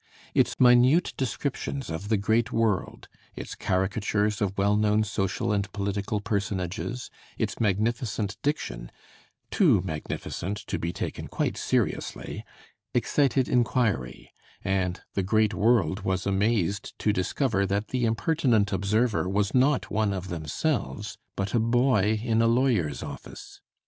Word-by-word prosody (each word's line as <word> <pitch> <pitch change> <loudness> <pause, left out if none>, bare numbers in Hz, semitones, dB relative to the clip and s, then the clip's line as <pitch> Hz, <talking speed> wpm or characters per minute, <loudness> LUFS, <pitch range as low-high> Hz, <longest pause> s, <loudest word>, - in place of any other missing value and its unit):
Its - - +2
minute 125 +7 +5
descriptions 135 - -3
of 90 +6 -5
the 110 - +3
great 110 +4 +1
world, 110 -5 -1 0.3
its - - -6
caricatures 105 +3 0
of 100 -1 -1
well 100 +1 +3
known 105 0 +3
social 100 -1 -1
and 100 -1 -1
political 100 +1 -2
personages, 100 +2 -3 0.3
its - - -2
magnificent 110 0 0
diction, - - -3 0.6
too - - +4
magnificent 90 +3 -4
to 105 - -4
be 85 - -2
taken - - -5
quite - - -1
seriously, - - -2 0.5
excited 135 -3 +2
inquiry; 115 - 0 0.3
and 95 -2 -1
the 100 - 0
great 110 +3 +2
world 105 -6 +2
was 95 -2 -1
amazed 100 -1 0
to 105 - +1
discover 100 +1 0
that 100 +2 -1
the 125 -1 -1
impertinent 115 -4 +2
observer 100 +1 +1
was 100 +1 0
not 130 +2 +2
one 105 -1 +1
of 95 -1 -5
themselves, 80 - -2 0.2
but 100 0 -3
a 120 - +3
boy 115 -3 +2
in 115 -2 +2
a 115 - +4
lawyer's 115 - +1
office. - - -9
105 Hz, 130 wpm, -27 LUFS, 95-115 Hz, 0.6 s, minute